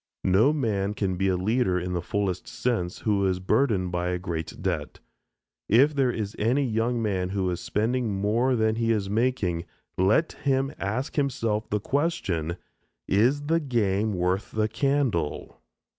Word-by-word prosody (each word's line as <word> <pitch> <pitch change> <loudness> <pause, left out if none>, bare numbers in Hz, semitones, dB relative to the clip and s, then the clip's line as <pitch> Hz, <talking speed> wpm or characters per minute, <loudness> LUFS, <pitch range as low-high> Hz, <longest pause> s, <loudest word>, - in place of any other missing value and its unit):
No 100 +9 +5
man 105 -8 -1
can 95 -3 -1
be 95 +2 0
a 95 -1 +2
leader 95 -1 +1
in 90 +1 -4
the 90 - -1
fullest 95 0 -2
sense 100 -8 -2
who 105 -3 +1
is 90 -1 0
burdened 100 -2 +1
by 90 0 -1
a 90 - 0
great 85 -3 -5
debt. - - -3 0.7
If 135 +8 +5
there 135 -3 +2
is 105 -4 -3
any 125 +6 +2
young 115 +1 0
man 95 -4 -1
who 95 -1 -1
is 90 - -3
spending 110 0 -1
more 115 +6 +2
than 110 -1 +1
he 115 0 +1
is 100 -3 -1
making, 105 -7 0 0.4
let 110 - +3
him 135 -1 0
ask 125 +11 -3
himself 115 -6 0
the 105 - 0
question, 100 - -1 0.5
Is 125 +9 +3
the 165 +3 +2
game 110 -7 0
worth 90 +2 0
the 110 0 0
candle? 120 - -1
105 Hz, 160 wpm, -26 LUFS, 95-125 Hz, 0.7 s, No